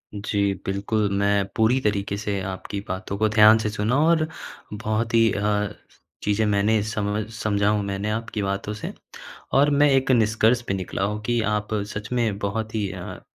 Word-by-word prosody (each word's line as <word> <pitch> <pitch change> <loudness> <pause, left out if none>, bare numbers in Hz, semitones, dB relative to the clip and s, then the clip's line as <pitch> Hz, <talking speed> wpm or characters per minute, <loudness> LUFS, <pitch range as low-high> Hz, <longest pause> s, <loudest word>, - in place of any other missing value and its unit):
जी, 100 -1 0
बिल्कुल। 100 +2 0
मैं 100 0 +2
पूरी 110 +4 +3
तरीके 100 -2 -1
से 100 -1 -2
आपकी 95 +1 -5
बातों 95 +1 -4
को 110 +1 +2
ध्यान 110 0 +7
से 110 -1 -1
सुना 110 +4 0
और 160 -1 +3 0.5
बहुत 110 +2 -2
ही 115 -1 +5
अ, 105 0 0 0.5
चीज़ें 105 +1 +1
मैंने 105 +1 +2
समझ 105 -1 -2
समझा 105 -2 0
हूँ 105 -1 +1
मैंने 100 +1 -3
आपकी 110 -1 -3
बातों 100 +2 -2
से। 105 - -6 0.6
और 140 +2 +5
मैं 145 +1 +4
एक 135 0 +3
निष्कर्ष 115 0 +3
पे - - 0
निकला 95 0 -3
हूँ 105 +2 -2
कि 120 +1 +1
आप 105 0 -1 0.2
सच 105 +2 -6
में 115 -5 0
बहुत 110 +2 -3
ही 105 -3 -1
अ, 90 -1 -7
105 Hz, 175 wpm, -24 LUFS, 100-110 Hz, 0.6 s, ध्यान